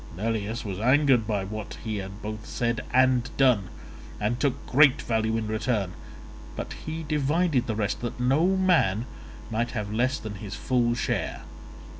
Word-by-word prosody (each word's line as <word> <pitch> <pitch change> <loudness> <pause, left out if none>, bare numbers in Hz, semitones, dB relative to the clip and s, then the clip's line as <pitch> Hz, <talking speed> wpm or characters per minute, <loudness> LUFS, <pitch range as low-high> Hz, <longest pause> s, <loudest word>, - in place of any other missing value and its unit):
Neleus 110 +2 -2
was 95 -2 -4
angered 130 -1 +4
by 105 -3 0
what 105 +2 -6
he 110 -2 -2
had 95 +1 -7
both 105 0 -6
said 120 -1 -1
and 130 -1 +3
done, 125 -8 +3 0.5
and 110 +4 -1
took 140 -3 -1
great 145 +1 +5
value 110 -2 0
in 110 - -2
return, 110 -3 -1 0.6
but - - -5
he 160 +1 -3
divided 150 -2 +1
the 110 - -1
rest, 105 -2 -1
that 120 0 -4
no 135 +7 +3
man 160 - +3 0.5
might 115 +2 0
have 105 0 -3
less 125 +4 +1
than 110 -2 -6
his 105 -1 -6
full 120 -2 +1
share. - - -2
115 Hz, 160 wpm, -26 LUFS, 105-130 Hz, 0.6 s, great